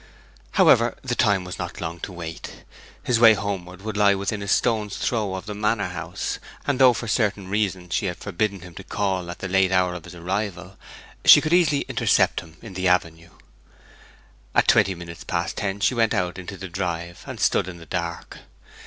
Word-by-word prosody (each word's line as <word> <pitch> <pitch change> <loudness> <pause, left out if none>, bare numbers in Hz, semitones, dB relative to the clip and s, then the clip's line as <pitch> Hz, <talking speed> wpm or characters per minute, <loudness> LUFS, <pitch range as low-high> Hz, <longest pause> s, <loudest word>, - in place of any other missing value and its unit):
However, - - +4
the - - -2
time 95 -2 +2
was 90 0 -7
not - - -5
long 85 +1 -5
to 95 - -6
wait. 85 -2 -8 0.4
His 120 -2 +1
way 115 -2 +8
homeward 95 -2 -5
would 110 -1 -4
lie 100 -1 +4
within 100 +2 -3
a 100 - -5
stone's 105 0 +1
throw 105 -5 -1
of 95 - -6
the 105 - -5
manor 105 0 0
house, - - -4 0.3
and 140 -2 0
though 130 -2 +7
for 115 - -5
certain 105 -4 0
reasons 95 -4 -1
she - - 0
had - - -4
forbidden 100 0 -2
him 90 -1 -11
to - - -9
call 95 -3 -2
at 85 - -6
the 95 - -5
late 95 0 +2
hour 90 -1 +2
of 90 -2 -8
his 90 0 -11
arrival, 95 +2 -4 0.5
she - - +10
could 155 +1 -1
easily 155 -5 +4
intercept - - +2
him 80 -2 -14
in 110 -4 -9
the 95 0 -1
avenue. 85 -2 0 1.3
At - - +4
twenty 95 0 +4
minutes 85 -1 -9
past 85 -1 -2
ten 100 -1 -2
she 105 - +3
went 115 -2 +2
out 90 +1 -1
into 95 +2 -8
the 95 - -7
drive, 85 -2 -4
and - - -7
stood - - +2
in 90 -2 -7
the 85 - -12
dark. 85 0 -5
95 Hz, 200 wpm, -23 LUFS, 90-105 Hz, 1.3 s, she